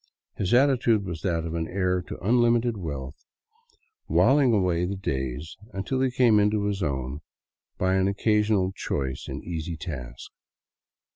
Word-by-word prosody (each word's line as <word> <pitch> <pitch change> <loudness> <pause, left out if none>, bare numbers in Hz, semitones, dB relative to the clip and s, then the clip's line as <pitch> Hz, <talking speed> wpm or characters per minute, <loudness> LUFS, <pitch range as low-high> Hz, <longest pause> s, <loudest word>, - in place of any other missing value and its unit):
His 95 - -2
attitude 120 -5 +3
was 85 -3 -5
that 85 -3 -1
of 80 - -4
an 80 -1 -2
heir 90 -1 0
to - - -6
unlimited 120 0 +3
wealth 70 -7 -6 0.8
whiling 135 -2 +4
away 90 -5 +2
the 95 +3 -2
days 70 -4 -4 0.2
until 115 +7 -2
he 130 - +2
came 120 -4 +4
into 105 0 +2
his 100 -1 -1
own 70 -2 -2 0.6
by 95 0 +1
an 95 0 +2
occasional 105 -1 +2
choice 65 -8 -3
and - - -6
easy 80 -1 -4
task. 65 -8 -7
95 Hz, 145 wpm, -26 LUFS, 80-110 Hz, 0.8 s, whiling